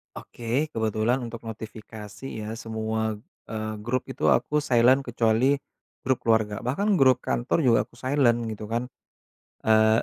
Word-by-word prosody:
Oke, 125 +7 -3
kebetulan 110 +2 0
untuk 115 -2 -7
notifikasi 110 0 -9 0.2
ya 110 +1 -5
semua, 110 -1 -3 0.3
eee, 110 -1 -3
grup 130 +3 -1
itu 130 - -7
aku 150 0 +2
silent 130 0 +4
kecuali 120 +3 +2 0.5
grup 130 -1 +1
keluarga. 110 -2 +1
Bahkan 195 - +1
grup 130 -6 +5
kantor 120 +7 0
juga 125 -7 +4
aku 120 - -20
silent 130 -2 +2
gitu 110 -1 -6
kan, 120 +2 -1 0.8
eee, 110 0 +4
115 Hz, 140 wpm, -26 LUFS, 110-130 Hz, 0.8 s, grup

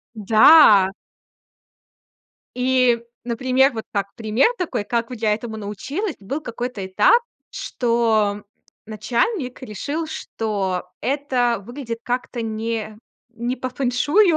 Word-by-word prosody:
Да. 215 -1 +7 1.7
И, 250 -1 +3 0.3
например, 255 +3 +2
вот 220 -2 -5
так 200 -1 -2
пример 225 - +2
такой, 335 - -2
как 230 +1 -1
я 220 -3 0
этому 220 0 -6
научилась. 270 - -4
Был 270 +10 -4
какой-то 240 -5 -5
этап, 470 - +4 0.3
что, 220 -4 0 0.4
начальник 240 - -2
решил, 285 +8 -4
что 200 - -3
это 250 -5 0
выглядит 240 0 -6
как-то 245 0 -3
не 220 -1 -3 0.3
не 240 +2 -3
по 255 0 -4
фэншую, 290 - +2
235 Hz, 105 wpm, -21 LUFS, 215-260 Hz, 1.7 s, Да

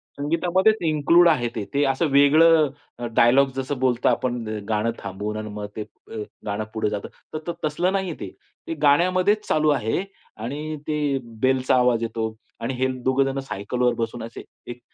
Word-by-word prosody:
संगीतामध्येच 175 +8 +2
include 160 +3 +5
आहे 125 -7 +2
ते. 110 - -2
ते 140 - +2
असं 135 +5 +1
वेगळं 155 +2 +6 0.5
डायलॉग 135 +4 +5
जसं 135 0 -3
बोलता 125 -2 +2
आपण 120 -2 -1 0.3
गाणं 110 +1 +1
थांबवून 105 +2 -5
आणि 110 0 -5
मग 105 0 -5
ते 110 - -4
अ, 105 - -12 0.3
गाणं 105 0 -2
पुढे 110 -1 0
जातं. 105 -1 -4 0.3
तर 155 +2 -4
तसलं 175 +5 0
नाहीये 190 -3 -1
ते. - - -5 0.4
ते 165 - -2
गाण्यामध्येच 185 +8 +3
चालू 155 0 +2
आहे 135 - 0 0.3
आणि 145 +7 -4
ते 150 -3 0 0.2
बेलचा 130 -1 +3
आवाज 125 -2 +3
येतो 110 -1 -3 0.3
आणि 120 +3 -3
हे 130 +1 0 0.2
दोघेजण 135 +1 +1
सायकलवर 125 0 -1
बसून 115 0 -4
असे 115 0 -8 0.3
एक 120 - -9
135 Hz, 160 wpm, -23 LUFS, 115-155 Hz, 0.5 s, वेगळं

